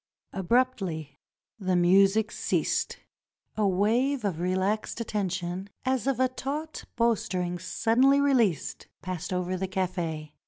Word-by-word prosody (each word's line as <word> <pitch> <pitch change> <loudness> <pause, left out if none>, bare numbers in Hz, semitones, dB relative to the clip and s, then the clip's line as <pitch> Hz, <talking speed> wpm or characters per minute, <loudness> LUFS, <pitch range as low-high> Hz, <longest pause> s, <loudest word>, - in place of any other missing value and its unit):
Abruptly 190 - 0 0.4
the 185 -2 0
music 195 +5 +4
ceased. - - -1 0.6
A 215 -2 +2
wave 225 +7 +1
of 180 -5 -1
relaxed 190 +6 -1
at 230 - -4
tention, 185 -1 -2 0.2
as 260 0 0
of 270 -3 +1
a 260 - +4
taut 290 +5 -5
bow 235 0 +4
string 180 -4 -3
suddenly 250 +9 +3
released, 240 - +1 0.2
passed 185 -2 -4
over 180 0 -1
the 190 +1 -2
cafe. 175 -5 -3
195 Hz, 125 wpm, -27 LUFS, 180-235 Hz, 0.6 s, music